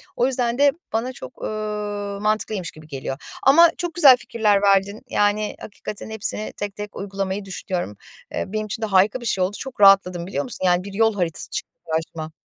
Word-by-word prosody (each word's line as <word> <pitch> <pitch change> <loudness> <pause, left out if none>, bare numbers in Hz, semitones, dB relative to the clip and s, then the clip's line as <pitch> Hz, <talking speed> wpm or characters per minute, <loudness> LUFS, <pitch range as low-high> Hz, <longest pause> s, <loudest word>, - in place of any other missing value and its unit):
o 245 - +2
yüzden 245 -2 0
de 285 0 +5 0.2
bana 235 +3 -1
çok, 130 - -11
ııı, 210 -1 -3
mantıklıymış 210 -4 -1
gibi 155 0 -15
geliyor 135 -2 -5 0.3
ama 330 +6 +7
çok 350 -2 -3
güzel 285 -7 +8
fikirler 210 -5 +1
verdin. 200 +1 +2
Yani, 205 +1 +1
hakikaten 210 +1 -7
hepsini 220 0 -3
tek 205 -1 -4
tek 210 0 -7
uygulamayı 195 0 -3
düşünüyorum. 180 - -4 0.4
Eee, - - -1
benim 215 +2 -3
için 215 +2 -5
de - - +1
harika 205 +4 +3
bir - - -7
şey 195 -4 +1
oldu. 190 +3 -1
Çok 265 -5 -7
rahatladım, 185 -3 +5
biliyor 195 - -2
musun? 240 -7 -3
Yani, 180 0 +3
bir 200 0 -8
yol 225 +1 +3
haritası 175 -5 -1
çıktı - - -5 0.2
karşıma. 160 -1 -3
205 Hz, 190 wpm, -22 LUFS, 190-220 Hz, 0.4 s, güzel